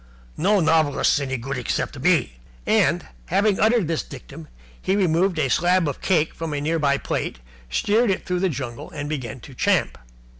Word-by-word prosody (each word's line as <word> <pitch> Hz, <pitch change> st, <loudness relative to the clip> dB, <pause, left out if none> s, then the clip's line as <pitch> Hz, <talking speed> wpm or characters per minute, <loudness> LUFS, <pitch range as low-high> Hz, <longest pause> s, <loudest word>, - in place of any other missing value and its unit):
No 200 Hz, +4 st, +2 dB
novelists 160 Hz, -3 st, +3 dB
any 130 Hz, -2 st, -2 dB
good 130 Hz, +3 st, -4 dB
except 120 Hz, -, -2 dB
me." -, -, +1 dB, 0.3 s
And, -, -, +2 dB, 0.2 s
having 205 Hz, -1 st, +2 dB
uttered 220 Hz, -4 st, +3 dB
this 165 Hz, -1 st, 0 dB
dictum, 70 Hz, +6 st, -11 dB, 0.3 s
he 190 Hz, -, +1 dB
removed 180 Hz, -1 st, +2 dB
a 150 Hz, -3 st, +2 dB
slab 175 Hz, +4 st, +2 dB
of 140 Hz, -, -4 dB
cake 165 Hz, -5 st, +1 dB
from 165 Hz, -2 st, -5 dB
a -, -, -1 dB
near 160 Hz, +3 st, 0 dB
by 140 Hz, -2 st, +2 dB
plate, -, -, -3 dB, 0.3 s
steered 215 Hz, -, +2 dB
it 190 Hz, -, -1 dB
through 180 Hz, -1 st, -1 dB
the 190 Hz, +1 st, +1 dB
jungle, 135 Hz, -1 st, -6 dB
and 145 Hz, -1 st, -5 dB
began 130 Hz, -6 st, -4 dB
to 135 Hz, -, -12 dB
champ. -, -, +1 dB
155 Hz, 180 wpm, -23 LUFS, 140-185 Hz, 0.3 s, novelists